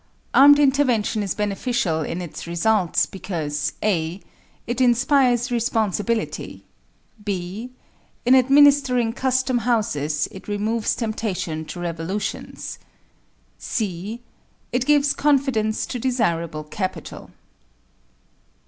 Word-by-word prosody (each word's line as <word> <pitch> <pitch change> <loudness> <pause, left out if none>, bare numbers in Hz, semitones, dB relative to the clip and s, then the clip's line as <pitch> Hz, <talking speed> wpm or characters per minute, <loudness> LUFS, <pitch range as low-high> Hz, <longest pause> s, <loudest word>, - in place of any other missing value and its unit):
Armed 285 +1 +8
intervention 265 -7 +2
is 200 -2 -2
beneficial 205 -4 -1
in 170 +4 -4
its 170 0 -8
results, 175 +2 +2
because 155 -6 -3
(a) 175 -3 0 0.5
It 240 +2 -2
inspires 250 0 +3
responsibility 225 -2 -1 0.6
(b) 200 +4 -4 0.6
In 250 - +5
administering 265 -3 +5
custom 260 -1 +1
houses 200 - 0
it 190 - -11
removes 215 +2 -1
temptation 190 -8 -3
to 175 - -8
revolutions 175 +4 -4 0.8
(c) 210 +2 -4 0.5
It 245 +1 -1
gives 290 -1 +4
confidence 265 -7 +1
to 250 - -5
desirable 170 -11 -1
capital. 185 +5 -5
220 Hz, 95 wpm, -22 LUFS, 180-250 Hz, 0.8 s, Armed